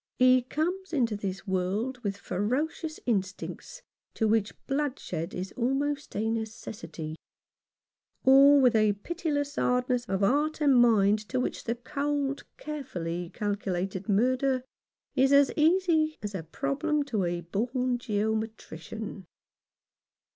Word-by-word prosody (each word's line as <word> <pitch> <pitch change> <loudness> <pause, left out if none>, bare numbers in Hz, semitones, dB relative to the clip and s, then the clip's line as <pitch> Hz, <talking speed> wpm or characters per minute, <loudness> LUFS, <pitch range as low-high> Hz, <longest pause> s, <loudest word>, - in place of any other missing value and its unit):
He 255 0 +6
comes 345 +8 -3
into 235 -7 +1
the 195 -2 -3
world 200 +7 -1
with 200 -4 -3
ferocious 270 - -2
instincts 220 - -3 0.3
to 220 - +1
which 215 -1 +2
bloodshed 270 - -2
is 185 +1 -4
almost 280 +4 -1
a 215 +2 0
necessity; 205 -8 -5 1.1
or 275 +2 +8
with 250 -3 +4
a 215 -1 +4
pitiless 290 - -3
hardness 250 0 +1
of 195 -3 -2
heart 290 +10 +2
and 285 -3 +4
mind 215 -4 +5
to 255 - 0
which 250 - -3
the 235 - 0
cold, 280 +2 -2
carefully 175 - -4
calculated 195 -2 -3
murder 255 +5 +2 0.5
is 265 0 +4
as 280 -1 +6
easy 320 -1 +3
as 205 0 -4
a 190 - -3
problem 285 - -1
to 230 -9 -1
a 175 0 -2
born 245 +8 -1
geometrician. 215 -3 -4
245 Hz, 120 wpm, -28 LUFS, 200-280 Hz, 1.1 s, or